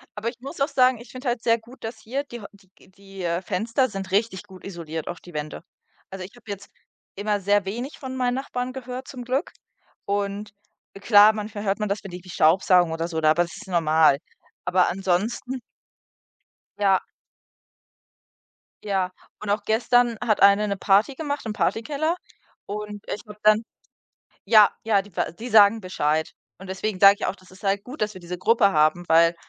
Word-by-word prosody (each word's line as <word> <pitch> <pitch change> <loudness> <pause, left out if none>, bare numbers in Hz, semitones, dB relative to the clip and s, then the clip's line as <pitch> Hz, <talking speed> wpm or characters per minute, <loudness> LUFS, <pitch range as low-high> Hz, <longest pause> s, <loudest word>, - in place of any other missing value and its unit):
Aber 215 +2 -2
ich 235 0 -12
muss 275 +3 -9
auch 275 - +4
sagen, 255 -3 +3
ich 240 -1 -13
finde 255 +1 -7
halt 240 -1 -2
sehr 230 -1 +3
gut, 235 +4 -16
dass 225 0 -6
hier 260 +6 -3
die 240 -4 -9
Häu - - -10
die 200 -2 -23 0.2
g 195 0 -11
äh, 170 +1 -1
Fenster 225 +7 0
sind 195 -2 -6
richtig 200 -1 0
gut 190 -3 -15
isoliert, 165 -4 -6
auch 175 - -5
die 175 - -14
Wände. 150 +1 -5 0.5
Also 190 -1 -7
ich 200 - -14
habe 245 - -18
jetzt 200 0 -7 0.5
immer 205 +1 -1
sehr 205 +1 +2
wenig 240 +9 -5
von 260 -1 -7
meinen 250 -1 0
Nachbarn 255 -1 -4
gehört 255 0 -7
zum 250 -2 -8
Glück. 260 +6 -1 0.5
Und, 200 0 -2 0.5
klar, 210 0 +7
manchmal 210 -1 -5
hört 200 0 0
man 210 -1 -1
das, 200 +1 -1
wenn 195 - -8
die 180 - -6
irgendwie 180 +1 -15
staubsaugen 175 +1 +4
oder 165 +1 -2
so 165 -2 -3
da, 155 0 +5
aber 175 +2 +3
das 170 -1 -9
ist - - -11
normal. 160 -4 +4 0.5
Aber 180 0 +3
ansonsten 195 +8 -1 1.2
Ja. 195 -2 +3 1.8
Ja. 190 -3 -1 0.3
Und 210 - -6
auch 205 +1 0
gestern 235 +2 +2
hat 215 -3 +1
eine 200 +1 +6
'ne 200 -1 -2
Party 205 +8 +3
gemacht 285 -2 -4
im 220 - -3
Partykeller, 290 +10 0 0.5
und 210 0 -6
ich - - -4
habe 210 0 -11
dann 215 +1 +5 0.8
Ja, 215 -1 +7
ja, 215 -3 +3
die 200 -2 -13
w - - -1
die 225 +8 -8
sagen 215 -1 +6
Bescheid. 160 -4 -1 0.3
Und 190 - -11
deswegen 190 +1 -3
sage 200 0 +8
ich - - -2
auch, - - -2
das 185 -1 -20
ist 185 +1 -17
halt 200 0 +1
gut, 255 +2 -7
dass 210 0 0
wir 185 - -10
diese 175 +1 -6
Gruppe 215 +2 +3
haben, 155 +3 +3
weil 165 +1 +5
205 Hz, 195 wpm, -24 LUFS, 185-230 Hz, 1.8 s, sage